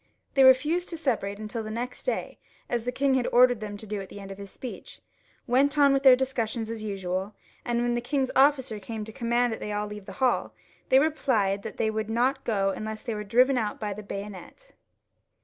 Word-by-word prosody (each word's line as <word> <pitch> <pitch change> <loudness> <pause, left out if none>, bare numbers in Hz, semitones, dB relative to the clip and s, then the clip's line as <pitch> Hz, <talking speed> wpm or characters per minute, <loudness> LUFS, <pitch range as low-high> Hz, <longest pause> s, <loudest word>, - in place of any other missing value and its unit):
They 270 - +5
refused 300 +7 +4
to 335 - -4
separate 220 -10 -1
until 215 +2 -5
the 215 - -6
next 240 +3 -5
day, - - -2 0.3
as 240 -1 -2
the 250 - 0
king 275 +1 +1
had 255 -2 +1
ordered 245 -1 +5
them 210 -1 -6
to 220 - -9
do 210 -1 -4
at 190 - -9
the - - -9
end 195 -1 -9
of 195 - -9
his 200 -1 -8
speech, 250 +5 -9 0.5
went 275 +4 +2
on 280 -1 +6
with 275 - +2
their 265 -2 +8
discussions 235 -4 -2
as 225 -1 -5
usual, 195 -1 -3 0.3
and 240 0 0
when 240 0 +1
the 240 - -1
king's 265 +1 -1
officer 265 -5 +3
came 215 +1 -6
to 220 - -9
command 240 -1 +1
them - - -6
to 210 0 -3
leave 210 -1 -8
the 195 - -7
hall, 255 +4 0 0.3
they 260 - +6
replied 255 -10 +1
that 220 - -8
they 220 - +1
would 220 0 -3
not 255 +4 +1
go 195 -3 +1
unless 215 +2 -5
they 235 - -3
were 210 0 -4
driven 250 +5 +3
out 210 -2 -3
by 210 -2 -3
the 210 - -8
bayonet. 200 - -8
230 Hz, 220 wpm, -27 LUFS, 210-260 Hz, 0.5 s, their